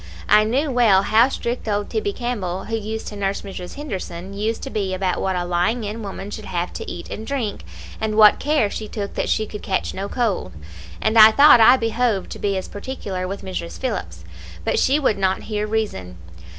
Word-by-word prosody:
I 210 0 +6
knew 270 +6 0
well 220 -6 +4
how 230 +5 +4
strict 240 -3 -4
old 205 -1 -1
Tibbie 215 -3 -1
Campbell, 200 -6 -3
who 225 - -2
used 220 0 -4
to 210 - -9
nurse 200 -1 -2
Mrs. 185 -3 -8
Henderson, 195 - -6
used 215 +3 -2
to 270 - -5
be 195 -3 -1
about 185 -1 -1
what 190 -1 0
a 175 -1 -1
lying 180 +7 0
in 210 +2 -5
woman 200 0 -7
should 215 0 -7
have 175 0 -3
to - - -6
eat 175 - -8
and 220 - -6
drink, 250 -7 -3 0.4
and 215 -1 -2
what 215 -1 +7
care 290 -9 +1
she 215 - -5
took 205 -2 -5
that - - -2
she 220 - +1
could 210 0 -8
catch 190 -2 -2
no 195 +1 -4
cold, 220 - -1 0.5
and 220 +1 +3
I 215 0 +11
thought 280 +1 +7
I 250 +4 +8
behoved 230 -3 0
to - - -7
be 200 -1 0
as 190 - -4
particular 200 -5 -5
with 195 +2 -6
Mrs. 175 -3 -5
Phillips; 85 - -4 0.4
but - - +1
she 275 +3 +3
would 220 -8 +1
not 190 -1 0
hear 210 -1 -3
reason. 200 - -3
210 Hz, 210 wpm, -21 LUFS, 190-225 Hz, 0.5 s, I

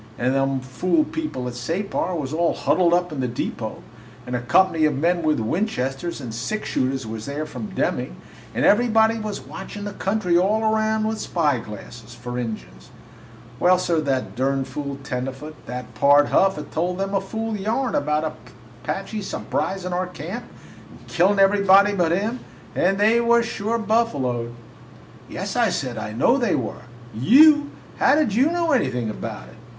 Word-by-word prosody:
And 125 +2 +1
them 135 -1 +1
fool 180 - +1
people 305 - -4
at 125 - -5
Separ 175 +8 -2
was 145 -3 -4
all 170 +1 +1
huddled 170 +5 +2
up 175 0 +2
in 150 - -5
the 130 - 0
depot, 120 - -4 0.4
and 125 - -4
a 120 - -1
company 160 +5 +3
of 150 -3 +1
men 170 +4 +1
with 155 -4 +1
Winchesters 160 - -2
and 120 -5 -6
six 125 - -3
shooters 130 -1 -1
was 110 0 -6
there 145 +2 -3
from 125 -8 -6
Deming, - - -1 0.4
and - - +1
everybody 225 0 +4
was 215 -2 -4
watchin' 205 +1 -8
the 205 - -5
country 195 -3 0
all 210 +4 +2
'round 220 0 +1
with 220 0 -2
spyglasses, 120 - -3
for 120 0 -5
Injuns! 65 - -7 0.7
Well, 180 +1 +5
sir, 170 -3 0
that 135 -3 -2
durn 135 +1 0
fool 140 -1 -5
tenderfoot, 135 +4 -5
that 125 0 -6
Pard 145 +5 +5
Huff, 195 0 +3
had 150 - -8
told 180 +3 -1
them 195 +1 -2
a 195 - +2
fool 220 +3 -4
yarn 225 +6 -1
about 150 +1 0
the - - -15 0.3
Apaches 195 +6 -4
surprisin' 185 -2 -2
our 180 +1 -1
camp 180 +7 -7 0.4
and - - -17
killin' 190 +4 +3
everybody 200 0 +5
but 175 -4 +1
him, 215 +8 -1 0.3
and 195 +2 +2
they 220 +3 +4
was 235 0 +3
sure 225 0 -2
buffaloed!" 140 - 0 0.7
"Yes," - - -4
I - - +3
said, 125 -4 -3
"I 110 - -5
know 140 - +3
they 240 -7 +1
were." 125 0 -4 0.3
"You! 290 - +6 0.3
How - - +5
did 300 -9 +1
you 265 +9 +3
know 340 -2 0
anything 130 - +1
about - - -7
it?" - - -16
170 Hz, 170 wpm, -23 LUFS, 130-210 Hz, 0.7 s, You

